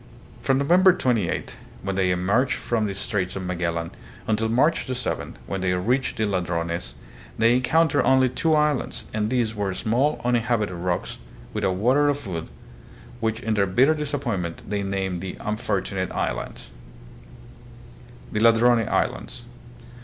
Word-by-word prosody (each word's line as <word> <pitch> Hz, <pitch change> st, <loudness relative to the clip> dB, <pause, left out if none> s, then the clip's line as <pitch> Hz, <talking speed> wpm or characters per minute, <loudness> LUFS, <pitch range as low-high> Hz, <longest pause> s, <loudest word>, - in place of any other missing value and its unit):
From 135 Hz, -, +2 dB
November 180 Hz, +7 st, +5 dB
28, 115 Hz, -, -1 dB, 0.3 s
when 95 Hz, 0 st, -2 dB
they 95 Hz, -1 st, +2 dB
emerged 100 Hz, +9 st, +2 dB
from 110 Hz, -3 st, -1 dB
the 100 Hz, -, -4 dB
Straits 95 Hz, -2 st, -2 dB
of 95 Hz, -, -4 dB
Magellan, 85 Hz, -2 st, -2 dB, 0.3 s
until 110 Hz, +1 st, 0 dB
March 135 Hz, +9 st, +2 dB
7, 125 Hz, -, -3 dB
when 95 Hz, +9 st, -4 dB
they 90 Hz, -1 st, +1 dB
reached 125 Hz, +9 st, 0 dB
the 110 Hz, -, +1 dB
Ladrones, 85 Hz, -, -2 dB, 0.4 s
they 115 Hz, +1 st, +4 dB
encountered 155 Hz, +5 st, +3 dB
only 130 Hz, 0 st, +4 dB
two 160 Hz, +5 st, +1 dB
islands, 150 Hz, -3 st, 0 dB
and 105 Hz, 0 st, 0 dB
these 120 Hz, -3 st, 0 dB
were 100 Hz, -3 st, -2 dB
small 125 Hz, +9 st, +1 dB
uninhabited 115 Hz, -5 st, +1 dB
rocks, 85 Hz, 0 st, -3 dB, 0.3 s
without 95 Hz, -2 st, 0 dB
water 130 Hz, +9 st, +3 dB
or 145 Hz, -, +2 dB
food, 90 Hz, -, -5 dB, 0.7 s
which 110 Hz, 0 st, -1 dB
in 110 Hz, -, -1 dB
their 100 Hz, -2 st, +2 dB
bitter 130 Hz, +11 st, +4 dB
disappointment 120 Hz, -, -3 dB
they 100 Hz, 0 st, -1 dB
named 95 Hz, -2 st, -2 dB
the 95 Hz, -1 st, -5 dB
Unfortu 105 Hz, -2 st, -2 dB
nate 95 Hz, -1 st, -2 dB
Islands. -, -, -4 dB, 1.6 s
The 105 Hz, -, -1 dB
Ladrone 115 Hz, 0 st, +4 dB
Islands. -, -, -2 dB
110 Hz, 145 wpm, -24 LUFS, 95-130 Hz, 1.6 s, November